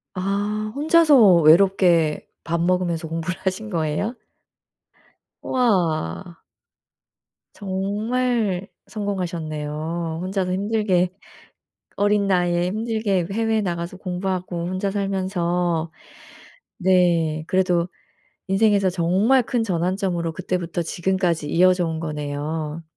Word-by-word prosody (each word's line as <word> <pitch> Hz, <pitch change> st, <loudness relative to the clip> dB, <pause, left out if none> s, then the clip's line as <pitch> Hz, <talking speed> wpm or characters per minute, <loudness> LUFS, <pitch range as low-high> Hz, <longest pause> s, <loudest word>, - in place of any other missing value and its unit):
아 205 Hz, +3 st, -2 dB
혼자서 290 Hz, -, +6 dB
외롭게 170 Hz, -1 st, +4 dB, 0.2 s
밥 170 Hz, 0 st, -1 dB
먹으면서 175 Hz, -2 st, 0 dB
공부를 165 Hz, +3 st, -4 dB
하신 200 Hz, +4 st, -2 dB
거예요? 165 Hz, +8 st, -1 dB, 1.3 s
우와. 170 Hz, -, 0 dB, 1.2 s
정말 205 Hz, +1 st, -1 dB, 0.2 s
성공하셨네요. 165 Hz, -4 st, -4 dB
혼자서 185 Hz, -1 st, -2 dB
힘들게 195 Hz, -3 st, +1 dB, 0.9 s
어린 205 Hz, 0 st, +2 dB
나이에 175 Hz, -2 st, +1 dB
힘들게 215 Hz, -3 st, -1 dB
해외에 225 Hz, 0 st, +1 dB
나가서 175 Hz, -1 st, -4 dB
공부하고 180 Hz, -2 st, -3 dB
혼자 185 Hz, +2 st, -2 dB
살면서 180 Hz, -4 st, -1 dB, 0.9 s
네. 170 Hz, -5 st, +2 dB
그래도 180 Hz, -2 st, +1 dB, 0.6 s
인생에서 195 Hz, -1 st, +3 dB
정말 190 Hz, +9 st, +2 dB
큰 235 Hz, -1 st, -1 dB
전환점으로 180 Hz, -2 st, -1 dB
그때부터 175 Hz, 0 st, -3 dB
지금까지 175 Hz, -2 st, -1 dB
이어져 180 Hz, 0 st, +3 dB
온 160 Hz, -1 st, -3 dB
거네요. 150 Hz, +1 st, -4 dB
185 Hz, 235 characters per minute, -22 LUFS, 170-200 Hz, 1.3 s, 혼자서